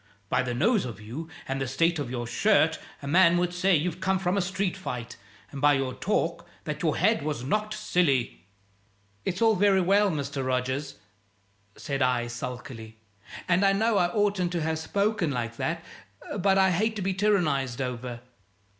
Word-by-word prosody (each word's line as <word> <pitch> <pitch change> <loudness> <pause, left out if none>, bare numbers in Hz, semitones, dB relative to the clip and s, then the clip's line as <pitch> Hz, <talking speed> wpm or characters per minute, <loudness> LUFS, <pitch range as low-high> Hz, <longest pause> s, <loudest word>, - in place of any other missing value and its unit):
By - - +2
the 125 -1 -3
nose 205 - +2
of 115 -5 -7
you 125 +10 -7 0.2
and 135 0 -2
the 135 - -1
state 165 +6 +1
of 140 -4 -3
your 120 -1 -3
shirt 160 - +2 0.2
a - - -5
man 170 +2 +5
would 175 0 0
say 185 +1 +3
you've 170 +3 -1
come 190 +1 +1
from 185 0 0
a 200 - +2
street 190 +1 -1
fight; 125 -11 -6 0.4
and 140 - -7
by 145 0 +5
your 135 -2 -1
talk, 170 -2 -1 0.2
that 150 -1 -4
your 160 -3 +1
head 215 +2 +3
was 145 -4 -3
knocked 215 +9 -1
silly." 165 - 0 0.8
"It's 180 +6 -1
all 225 -1 +5
very 195 0 +4
well, 200 +3 +3
Mr. 140 -4 -3
Rogers," 130 +2 -2 0.8
said 140 -1 -4
I, 125 -2 +2
sulkily, 120 -2 -7 0.5
"and 180 +2 +3
I 195 0 +5
know 215 +1 +2
I 175 - +3
oughtn't 195 -2 0
to 170 -3 -1
have 160 0 -1
spoken 200 +1 0
like 115 -4 -3
that, 165 +1 -3 0.5
but 195 +1 +3
I 190 -1 +4
hate 215 +5 0
to 205 - -3
be 190 +1 0
tyrannized 155 - +1
over. 125 -2 -4
165 Hz, 180 wpm, -27 LUFS, 130-195 Hz, 0.8 s, man